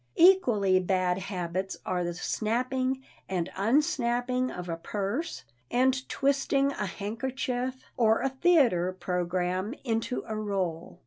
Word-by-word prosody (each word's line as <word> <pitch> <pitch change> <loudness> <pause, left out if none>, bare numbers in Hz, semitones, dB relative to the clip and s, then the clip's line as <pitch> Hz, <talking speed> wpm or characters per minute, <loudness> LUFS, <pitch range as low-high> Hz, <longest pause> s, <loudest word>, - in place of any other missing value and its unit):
Equally 240 - +5
bad 185 -1 +1
habits 185 0 -3
are 180 -1 0
the 175 0 -3
snapping 255 +7 -1 0.3
and 180 -3 -1
unsnapping 245 +2 +1
of 180 0 -6
a 165 - -2
purse 205 - -3 0.3
and 260 +1 +2
twisting 275 0 +2
a 210 -7 -3
handkerchief 250 +5 -3
or 225 -2 +4
a 270 - +2
theater 260 - +3
program 180 +4 -1
into 230 0 -1
a 220 - -4
roll. 190 -6 -3
220 Hz, 120 wpm, -28 LUFS, 185-260 Hz, 0.3 s, Equally